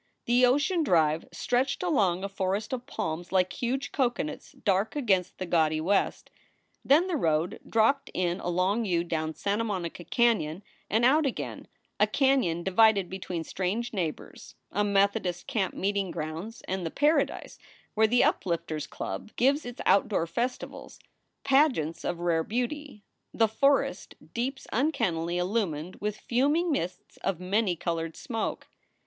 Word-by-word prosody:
The 245 Hz, +1 st, +5 dB
Ocean 290 Hz, +8 st, +2 dB
Drive 160 Hz, -, +2 dB
stretched 265 Hz, +6 st, 0 dB
along 195 Hz, -, +2 dB
a -, -, -1 dB
forest 195 Hz, +3 st, -2 dB
of 250 Hz, 0 st, -4 dB
palms 170 Hz, -, -4 dB
like 185 Hz, -1 st, +2 dB
huge 255 Hz, +3 st, -2 dB
coconuts 240 Hz, -, -2 dB
dark 195 Hz, +4 st, 0 dB
against 190 Hz, -10 st, +1 dB
the 185 Hz, -, -4 dB
gaudy 160 Hz, -3 st, +2 dB
west. 190 Hz, +6 st, 0 dB, 0.5 s
Then 305 Hz, +6 st, +5 dB
the 370 Hz, -3 st, -1 dB
road 165 Hz, -, 0 dB
dropped 230 Hz, +5 st, +2 dB
in 180 Hz, 0 st, 0 dB
a -, -, -3 dB
long 185 Hz, +6 st, +1 dB
U 175 Hz, -5 st, +1 dB
down 160 Hz, -2 st, -2 dB
Santa 205 Hz, +7 st, -1 dB
Monica 180 Hz, -5 st, -4 dB
Canon 185 Hz, -4 st, +1 dB, 0.3 s
and 225 Hz, +3 st, +3 dB
out 290 Hz, +3 st, +4 dB
again 260 Hz, -, -5 dB, 0.3 s
a -, -, +5 dB
canon 260 Hz, -, +2 dB
divided 195 Hz, 0 st, +4 dB
between 185 Hz, -3 st, -4 dB
strange 200 Hz, +8 st, -2 dB
neighbors, 170 Hz, -7 st, -5 dB, 0.2 s
a 205 Hz, -, +1 dB
Methodist 195 Hz, -3 st, +1 dB
camp 220 Hz, -9 st, -1 dB
meeting 200 Hz, -1 st, -1 dB
grounds 165 Hz, +7 st, -6 dB
and 190 Hz, 0 st, -2 dB
the 165 Hz, -, -2 dB
paradise 295 Hz, -, 0 dB, 0.3 s
where 220 Hz, 0 st, +4 dB
the 245 Hz, +3 st, +4 dB
Uplifters 165 Hz, -4 st, -1 dB
Club -, -, -5 dB
gives 275 Hz, +3 st, +2 dB
its 245 Hz, -, -7 dB
outdoor 195 Hz, -3 st, +3 dB
festivals, 240 Hz, +10 st, -4 dB, 0.5 s
pageants 265 Hz, -, +2 dB
of 175 Hz, -, -2 dB
rare 165 Hz, -2 st, +1 dB
beauty, 250 Hz, -, -4 dB, 0.3 s
the 225 Hz, -, +4 dB
forest 275 Hz, +6 st, +1 dB, 0.2 s
deeps 265 Hz, +3 st, -3 dB
uncannily 180 Hz, -, 0 dB
illumined 180 Hz, -3 st, -1 dB
with 210 Hz, 0 st, -3 dB
fuming 290 Hz, +8 st, +1 dB
mists 180 Hz, -, -4 dB
of 190 Hz, -4 st, -2 dB
many 190 Hz, +1 st, +1 dB
colored 165 Hz, -1 st, -3 dB
smoke. 225 Hz, -4 st, -3 dB
200 Hz, 145 wpm, -28 LUFS, 175-245 Hz, 0.5 s, The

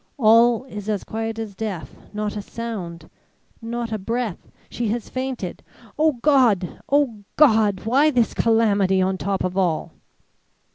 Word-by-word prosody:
All 230 Hz, 0 st, +5 dB
is 210 Hz, -4 st, -7 dB
as 210 Hz, -2 st, -1 dB
quiet 225 Hz, 0 st, -4 dB
as 220 Hz, -3 st, -5 dB
death; 195 Hz, -4 st, -5 dB, 0.2 s
not 210 Hz, 0 st, -3 dB
a 210 Hz, -, -3 dB
sound, 200 Hz, -7 st, -6 dB, 0.5 s
not 235 Hz, 0 st, -4 dB
a 215 Hz, -, -2 dB
breath 230 Hz, -1 st, -3 dB, 0.2 s
she 235 Hz, -, -3 dB
has 225 Hz, +2 st, -3 dB
fainted. 255 Hz, -8 st, -4 dB, 0.3 s
O 310 Hz, 0 st, +3 dB
God! 240 Hz, -, +2 dB
O 265 Hz, -8 st, +1 dB
God! 220 Hz, -9 st, +4 dB
Why 275 Hz, +7 st, +4 dB
this 245 Hz, -6 st, +1 dB
calamity 205 Hz, -4 st, +2 dB
on 185 Hz, 0 st, 0 dB
top 195 Hz, -1 st, -1 dB
of 185 Hz, 0 st, -2 dB
all!" 180 Hz, -5 st, 0 dB
220 Hz, 145 wpm, -22 LUFS, 200-240 Hz, 0.5 s, All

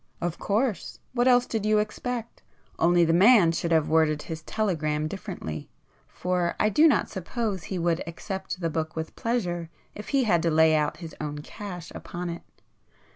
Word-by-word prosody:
"Of 175 Hz, -1 st, -3 dB
course! 215 Hz, +1 st, -1 dB, 0.2 s
what 245 Hz, 0 st, +2 dB
else 245 Hz, -1 st, +5 dB
did 220 Hz, -4 st, -2 dB
you 215 Hz, 0 st, +3 dB
expect? 230 Hz, +2 st, -3 dB, 0.4 s
Only 175 Hz, +1 st, +4 dB
the 165 Hz, -, +2 dB
man 195 Hz, -1 st, +6 dB
should 165 Hz, +1 st, -2 dB
have 160 Hz, -2 st, +3 dB
worded 155 Hz, -2 st, +2 dB
his 160 Hz, -1 st, -6 dB
telegram 155 Hz, -7 st, -1 dB
differently, 175 Hz, -, -6 dB, 0.4 s
for 180 Hz, -1 st, -1 dB
I 210 Hz, -, +3 dB
do 300 Hz, +10 st, +6 dB
not 300 Hz, -, +3 dB
suppose 195 Hz, 0 st, -3 dB
he 190 Hz, -, -4 dB
would 170 Hz, -1 st, +1 dB
accept 190 Hz, +2 st, -5 dB
the 165 Hz, -1 st, -1 dB
book 160 Hz, 0 st, -3 dB
with 160 Hz, 0 st, -5 dB
pleasure 175 Hz, -8 st, -2 dB, 0.2 s
if 210 Hz, -, -9 dB
he 275 Hz, -2 st, +3 dB
had 175 Hz, -8 st, +3 dB
to 165 Hz, -, +1 dB
lay 160 Hz, 0 st, +5 dB
out 150 Hz, -1 st, 0 dB
his 160 Hz, -, -9 dB
own 150 Hz, -1 st, -4 dB
cash 180 Hz, -4 st, -8 dB
upon 175 Hz, 0 st, -5 dB
it. 170 Hz, -, -7 dB
175 Hz, 180 wpm, -26 LUFS, 160-215 Hz, 0.4 s, man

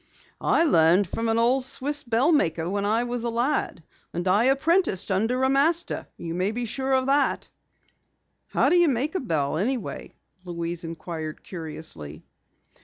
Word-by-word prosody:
"I -, -, +3 dB
learned 180 Hz, -, +4 dB
from 225 Hz, +5 st, -2 dB
an 225 Hz, -, +1 dB
old 250 Hz, +3 st, +3 dB
Swiss 285 Hz, +3 st, -3 dB
bell 240 Hz, +6 st, +2 dB
maker 165 Hz, -, +1 dB
when 200 Hz, +2 st, -1 dB
I 225 Hz, +3 st, +2 dB
was 245 Hz, -1 st, -3 dB
a 240 Hz, -, -1 dB
lad. 235 Hz, -, -1 dB, 0.3 s
And 175 Hz, +2 st, -2 dB
I 205 Hz, +6 st, +4 dB
apprenticed 275 Hz, -, +2 dB
under 225 Hz, +7 st, +1 dB
a 265 Hz, -, +3 dB
master, 320 Hz, +5 st, +1 dB
you 165 Hz, -1 st, -5 dB
may 185 Hz, +4 st, 0 dB
be 240 Hz, +2 st, -3 dB
sure 265 Hz, +4 st, -2 dB
of 260 Hz, 0 st, +2 dB
that." 275 Hz, +1 st, +1 dB, 1.0 s
"How -, -, +2 dB
do 355 Hz, -, +4 dB
you 345 Hz, -1 st, +5 dB
make 275 Hz, +3 st, 0 dB
a 375 Hz, -, 0 dB
bell 155 Hz, -, -1 dB
anyway?" 235 Hz, +5 st, -3 dB, 0.3 s
Louise 170 Hz, -1 st, -4 dB
inquired 165 Hz, -1 st, -6 dB
curiously. 155 Hz, -, -7 dB
230 Hz, 165 wpm, -25 LUFS, 170-270 Hz, 1.0 s, you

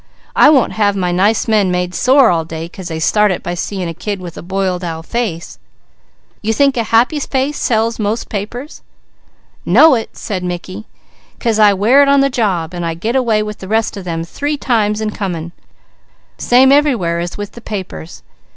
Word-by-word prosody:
I -, -, +7 dB
won't 275 Hz, -5 st, +3 dB
have 205 Hz, -2 st, +1 dB
my 180 Hz, -2 st, -1 dB
nice 200 Hz, +5 st, +1 dB
men 210 Hz, -4 st, +2 dB
made 180 Hz, 0 st, -1 dB
sore 260 Hz, -1 st, +4 dB
all 165 Hz, -2 st, 0 dB
day 160 Hz, 0 st, -6 dB
'cause 180 Hz, +1 st, -9 dB
they 160 Hz, -2 st, -4 dB
start 210 Hz, +6 st, +3 dB
it 185 Hz, -, -3 dB
by 175 Hz, -, -3 dB
seeing 185 Hz, +1 st, -4 dB
a 165 Hz, -, -4 dB
kid 205 Hz, +4 st, -5 dB
with 175 Hz, -2 st, -9 dB
a -, -, -8 dB
boiled 185 Hz, 0 st, -2 dB
owl 165 Hz, -2 st, -5 dB
face." 200 Hz, -5 st, -4 dB, 0.8 s
"You 220 Hz, +1 st, 0 dB
think 275 Hz, +3 st, +2 dB
a 230 Hz, -2 st, -1 dB
happy 235 Hz, +8 st, +2 dB
face 275 Hz, +1 st, -2 dB
sells 225 Hz, 0 st, 0 dB
most 215 Hz, +2 st, -2 dB
papers?" 240 Hz, +8 st, -6 dB, 0.8 s
"Know 280 Hz, -, +6 dB
it!" 225 Hz, -3 st, -3 dB
said 190 Hz, -3 st, -4 dB
Mickey, 180 Hz, +4 st, -6 dB, 0.5 s
"'cause 225 Hz, -3 st, 0 dB
I 205 Hz, -2 st, +5 dB
wear 230 Hz, +9 st, +4 dB
it 280 Hz, -, +4 dB
on 280 Hz, 0 st, +5 dB
the 275 Hz, 0 st, +1 dB
job, 185 Hz, -9 st, -1 dB
and 175 Hz, -1 st, -4 dB
I 165 Hz, -1 st, -2 dB
get 220 Hz, +9 st, -3 dB
away 230 Hz, -5 st, +2 dB
with 210 Hz, 0 st, -7 dB
the 190 Hz, -, -9 dB
rest 220 Hz, +2 st, 0 dB
of 200 Hz, -, -7 dB
them 165 Hz, -2 st, -3 dB
three 290 Hz, -, -3 dB
times 220 Hz, -6 st, 0 dB
and 215 Hz, -1 st, -2 dB
coming. 170 Hz, -4 st, -4 dB, 0.9 s
Same 260 Hz, +2 st, +4 dB
everywhere 240 Hz, -, +2 dB
as 175 Hz, 0 st, -5 dB
with 205 Hz, 0 st, -6 dB
the 235 Hz, -, -12 dB
papers. 190 Hz, -6 st, -7 dB
210 Hz, 195 wpm, -16 LUFS, 180-235 Hz, 0.9 s, I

